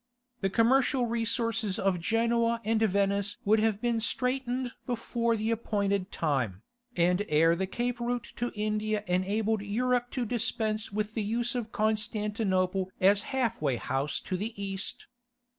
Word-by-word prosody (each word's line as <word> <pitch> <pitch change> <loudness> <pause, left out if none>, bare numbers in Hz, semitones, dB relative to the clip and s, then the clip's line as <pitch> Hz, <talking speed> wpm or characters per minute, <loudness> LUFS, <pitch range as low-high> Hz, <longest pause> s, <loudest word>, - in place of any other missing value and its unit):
The 195 - 0
commercial 250 +4 +3
resources 230 -3 -1
of 190 -2 +1
Genoa 230 +4 +1
and 225 0 +2
Venice 200 -1 +1
would 215 +2 +4
have 215 -2 +1
been 235 0 +1
straitened 250 +1 -1 0.2
before 235 -1 0
the 220 +1 -1
appointed 200 -4 0
time, 125 - -1 0.3
and 180 +3 +3
ere 165 +2 +4
the 190 +2 -1
Cape 245 +4 -2
route 240 0 -3
to 240 +1 -1
India 215 0 -1
enabled 205 +4 0
Europe 245 +4 0
to 245 - +1
dispense 220 -2 -1
with 210 +1 -2
the 220 - -1
use 235 +4 -1
of 235 -3 -3
Constantinople 210 -3 0
as 200 +2 +5
half 245 - 0
way 140 -4 +1
house 135 +5 -1
to 185 - -3
the 215 +2 -5
East. 195 -1 -4
215 Hz, 145 wpm, -29 LUFS, 195-235 Hz, 0.3 s, as